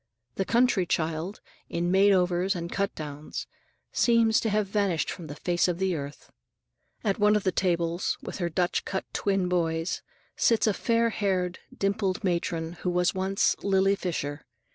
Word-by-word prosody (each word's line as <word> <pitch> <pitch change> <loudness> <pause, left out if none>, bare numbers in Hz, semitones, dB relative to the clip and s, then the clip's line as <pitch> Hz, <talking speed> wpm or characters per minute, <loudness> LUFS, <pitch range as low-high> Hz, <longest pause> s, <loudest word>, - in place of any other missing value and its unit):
The 195 - -1
country 230 -5 +3
child, 165 +5 -2 0.3
in 175 +1 -1
made 195 +2 +5
overs 180 +1 +2
and 170 -1 -4
cut 200 0 -1
downs, 150 -1 -6 0.5
seems 230 -2 +4
to 225 - -1
have 210 0 +1
vanished 195 -4 0
from 170 - -8
the 145 - -7
face 175 +4 +1
of 175 -2 -1
the 190 0 0
earth. 145 -1 -7 0.7
At 200 -1 0
one 210 +1 +5
of 210 - +1
the 185 - +2
tables, 170 -1 0
with - - -7
her 175 -2 0
Dutch 175 +1 0
cut 190 - -3
twin 195 -2 +1
boys, 165 -1 0 0.3
sits 230 -2 +3
a 215 - +3
fair 230 +2 +1
haired, 185 -4 -1
dimpled 195 -1 -1
matron 170 -2 -1
who 180 - 0
was 180 0 +2
once 195 +4 +1
Lily 195 0 +3
Fisher. 150 -6 -3
185 Hz, 165 wpm, -27 LUFS, 170-200 Hz, 0.7 s, made